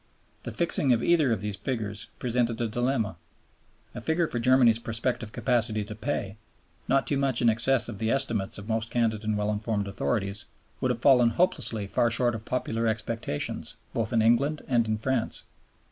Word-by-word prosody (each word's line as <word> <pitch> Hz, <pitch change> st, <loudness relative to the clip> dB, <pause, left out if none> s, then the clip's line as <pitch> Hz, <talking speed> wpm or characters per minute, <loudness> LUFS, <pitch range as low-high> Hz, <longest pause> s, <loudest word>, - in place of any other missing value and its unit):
The -, -, -6 dB
fixing 150 Hz, -6 st, +2 dB
of 115 Hz, -, 0 dB
either 160 Hz, -7 st, +3 dB
of 110 Hz, -4 st, 0 dB
these 105 Hz, -1 st, -4 dB
figures 110 Hz, -6 st, -4 dB
presented 120 Hz, -1 st, 0 dB
a 120 Hz, -, 0 dB
dilemma. 120 Hz, -1 st, -1 dB, 0.8 s
A -, -, -7 dB
figure 165 Hz, +1 st, +1 dB
for 120 Hz, -, -2 dB
Germany's 120 Hz, -2 st, +5 dB
prospective 115 Hz, -1 st, -2 dB
capacity 110 Hz, -4 st, 0 dB
to 105 Hz, +1 st, -7 dB
pay, 110 Hz, -3 st, -3 dB, 0.5 s
not 135 Hz, +1 st, +2 dB
too 140 Hz, -, 0 dB
much 135 Hz, -3 st, +2 dB
in 120 Hz, -, +4 dB
excess 120 Hz, +2 st, +2 dB
of 110 Hz, -4 st, -7 dB
the 110 Hz, -, 0 dB
estimates 115 Hz, -7 st, 0 dB
of 100 Hz, +1 st, -9 dB
most 110 Hz, 0 st, -1 dB
candid 115 Hz, -3 st, 0 dB
and 105 Hz, -1 st, 0 dB
well 105 Hz, 0 st, 0 dB
informed 105 Hz, -1 st, -2 dB
authorities, 100 Hz, +1 st, -2 dB, 0.3 s
would 130 Hz, -, 0 dB
have 120 Hz, -1 st, -2 dB
fallen 125 Hz, -4 st, +6 dB
hopelessly 115 Hz, -, 0 dB
far 120 Hz, +4 st, +1 dB
short 120 Hz, +1 st, +1 dB
of 110 Hz, -1 st, -6 dB
popular 115 Hz, -2 st, -1 dB
expectations 110 Hz, -7 st, -2 dB, 0.2 s
both 115 Hz, -2 st, -1 dB
in 115 Hz, -2 st, +3 dB
England 140 Hz, +7 st, +2 dB
and 120 Hz, -3 st, +2 dB
in 110 Hz, 0 st, 0 dB
France. 125 Hz, +1 st, -1 dB
115 Hz, 180 wpm, -27 LUFS, 110-125 Hz, 0.8 s, fallen